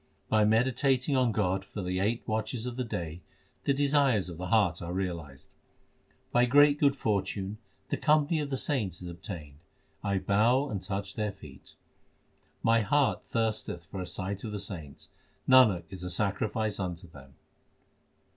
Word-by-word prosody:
By 110 Hz, -1 st, +4 dB
meditating 130 Hz, +4 st, +2 dB
on 125 Hz, -3 st, +3 dB
God 95 Hz, -3 st, 0 dB
for 100 Hz, +1 st, -7 dB
the 90 Hz, +1 st, -1 dB
eight 110 Hz, +5 st, -1 dB
watches 110 Hz, +2 st, -2 dB
of 125 Hz, -1 st, -4 dB
the 130 Hz, -, -2 dB
day, 85 Hz, -7 st, -5 dB, 0.4 s
the -, -, +3 dB
desires 140 Hz, -8 st, +2 dB
of 85 Hz, -1 st, -8 dB
the 90 Hz, -, -4 dB
heart 100 Hz, -5 st, +2 dB
are 85 Hz, 0 st, -5 dB
realised. 85 Hz, -7 st, -5 dB, 0.8 s
By 120 Hz, 0 st, +4 dB
great 145 Hz, +3 st, +5 dB
good 140 Hz, -2 st, +4 dB
fortune 100 Hz, 0 st, -2 dB, 0.3 s
the -, -, -1 dB
company 155 Hz, +1 st, +3 dB
of 145 Hz, -2 st, -3 dB
the 135 Hz, -, -1 dB
saints 105 Hz, -, -2 dB
is -, -, -6 dB
ob 85 Hz, 0 st, -10 dB
tained; 75 Hz, -9 st, -8 dB, 0.5 s
I 100 Hz, -1 st, 0 dB
bow 115 Hz, +9 st, +2 dB
and 100 Hz, -3 st, -3 dB
touch 95 Hz, +1 st, -4 dB
their 105 Hz, -1 st, -2 dB
feet. 75 Hz, -8 st, -14 dB, 0.9 s
My 115 Hz, 0 st, +4 dB
heart 140 Hz, +6 st, +2 dB
thirsteth 110 Hz, -6 st, -2 dB
for 95 Hz, +4 st, -6 dB
a 90 Hz, -, -5 dB
sight 95 Hz, +2 st, -4 dB
of 110 Hz, -, -4 dB
the 105 Hz, -, -4 dB
saints; 85 Hz, -8 st, -7 dB, 0.4 s
Nanak 120 Hz, -9 st, +6 dB
is 95 Hz, -2 st, -8 dB
a 90 Hz, -, -4 dB
sacrifice 105 Hz, +3 st, 0 dB
unto 90 Hz, -2 st, -4 dB
them. 70 Hz, -4 st, -15 dB
105 Hz, 165 wpm, -29 LUFS, 90-125 Hz, 0.9 s, Nanak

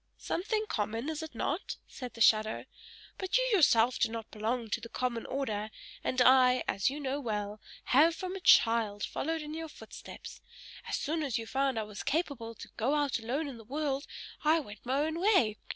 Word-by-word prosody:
"Something 430 Hz, +4 st, -1 dB
common, 225 Hz, -, -2 dB
is 315 Hz, -1 st, -3 dB
it 315 Hz, -6 st, -8 dB
not," 310 Hz, -, -2 dB
said 250 Hz, -3 st, -8 dB
the 230 Hz, -, -8 dB
shadow. 215 Hz, 0 st, +4 dB, 0.5 s
"But 380 Hz, +4 st, +1 dB
you -, -, +2 dB
yourself 255 Hz, -, +5 dB
do -, -, +3 dB
not 225 Hz, -1 st, -6 dB
belong 225 Hz, +1 st, -2 dB
to -, -, -1 dB
the 230 Hz, -, -8 dB
common 240 Hz, -2 st, -2 dB
order; 220 Hz, -6 st, -2 dB, 0.3 s
and 255 Hz, -, -1 dB
I, 255 Hz, -1 st, +6 dB
as 195 Hz, +5 st, +1 dB
you 285 Hz, +2 st, -5 dB
know 275 Hz, 0 st, -2 dB
well, 210 Hz, -4 st, -3 dB, 0.2 s
have 315 Hz, +6 st, +5 dB
from 370 Hz, +1 st, -5 dB
a -, -, -4 dB
child 225 Hz, -, +4 dB
followed 320 Hz, +1 st, -2 dB
in 300 Hz, 0 st, -7 dB
your 325 Hz, 0 st, -5 dB
footsteps. -, -, -10 dB, 0.5 s
As -, -, -1 dB
soon 315 Hz, +2 st, -1 dB
as 275 Hz, -6 st, -1 dB
you 225 Hz, -, -4 dB
found 270 Hz, +1 st, 0 dB
I 220 Hz, -, 0 dB
was 210 Hz, -1 st, -7 dB
capable 275 Hz, -8 st, -2 dB
to -, -, -10 dB
go 255 Hz, +6 st, +1 dB
out 290 Hz, -4 st, +1 dB
alone 265 Hz, +7 st, -2 dB
in 265 Hz, -4 st, -7 dB
the -, -, -11 dB
world, 280 Hz, +3 st, -2 dB, 0.4 s
I 315 Hz, +2 st, +4 dB
went 220 Hz, -5 st, -10 dB
my 270 Hz, +3 st, +2 dB
own 315 Hz, +2 st, -1 dB
way. 340 Hz, -, +3 dB
260 Hz, 200 wpm, -31 LUFS, 225-310 Hz, 0.5 s, I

